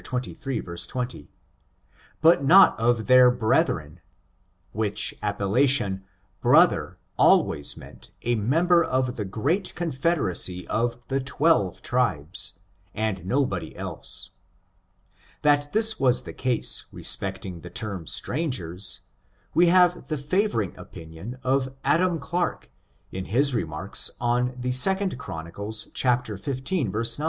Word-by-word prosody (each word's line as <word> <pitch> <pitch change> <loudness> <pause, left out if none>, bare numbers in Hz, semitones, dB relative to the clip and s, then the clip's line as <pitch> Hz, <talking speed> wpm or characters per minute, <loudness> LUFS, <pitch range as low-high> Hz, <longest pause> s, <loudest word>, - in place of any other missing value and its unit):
xxiii, 125 0 -3 0.4
20, 120 -1 -5 0.9
but 160 -2 +5
not 185 +3 +7
of 115 -1 +1
their 125 -1 +7
brethren^ 120 -3 0 0.7
which 105 -2 -2
ap 105 -1 -2
pellation 105 -2 +2 0.4
brother - - +4 0.2
always 70 - +3
meant - - -12
a 120 - +1
member 165 - +3
of 130 -3 -1
the 110 - -3
great 145 - -1
confederacy 130 - -1
of 120 +1 -2
the 135 0 0
twelve 130 - +1
tribes, 100 - -1 0.4
and 105 -4 -2
nobody 100 - -1
else. - - -5 1.1
That 145 0 +3
this 220 0 +3
was 125 -1 +3
the - - -8
case 125 -2 -1
respecting 95 -2 -2
the 90 - -9
term 95 -7 -5
strangers, 95 - -2 0.5
we 175 +3 +5
have 180 0 +4
the 155 - -2
favoring 145 - -1
opinion 80 +10 -9
of 130 0 0
Adam 175 +1 +2
Clarke, 170 +4 -3 0.4
in 95 0 -5
his 135 +6 +1
remarks 90 -4 -1
on 125 +1 0
the 125 0 -2
2 190 +9 +2
Chron. 80 -7 -7
xv, 105 +4 -3
9. 125 - -1
125 Hz, 115 wpm, -25 LUFS, 100-145 Hz, 1.1 s, not